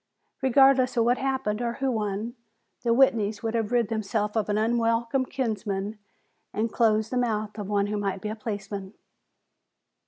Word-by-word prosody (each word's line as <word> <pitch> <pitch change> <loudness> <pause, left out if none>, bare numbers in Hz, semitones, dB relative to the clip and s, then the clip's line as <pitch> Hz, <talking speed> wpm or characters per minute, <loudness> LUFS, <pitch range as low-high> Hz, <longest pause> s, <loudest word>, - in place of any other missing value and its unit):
Regardless 265 -1 +4
of 230 - +5
what 245 +1 +2
happened 265 -5 -1
or 235 -1 -1
who 270 +1 -1
won, 215 0 -2 0.5
the 240 - -2
Whitneys 230 -5 +3
would 225 0 -1
have 225 -1 -1
rid 240 -3 +2
themselves 210 -1 -1
of 215 -2 0
an 205 - +1
unwelcome 230 +3 +1
kinsman 210 -5 -3 0.5
and 220 +1 -2
closed 220 -2 +2
the 255 - 0
mouth 215 -3 -1
of 205 -1 -5
one 200 -1 +2
who 210 +1 -2
might 195 -2 -2
be 210 - -4
a 215 - -3
policeman. 205 -2 -5
220 Hz, 165 wpm, -26 LUFS, 210-240 Hz, 0.5 s, of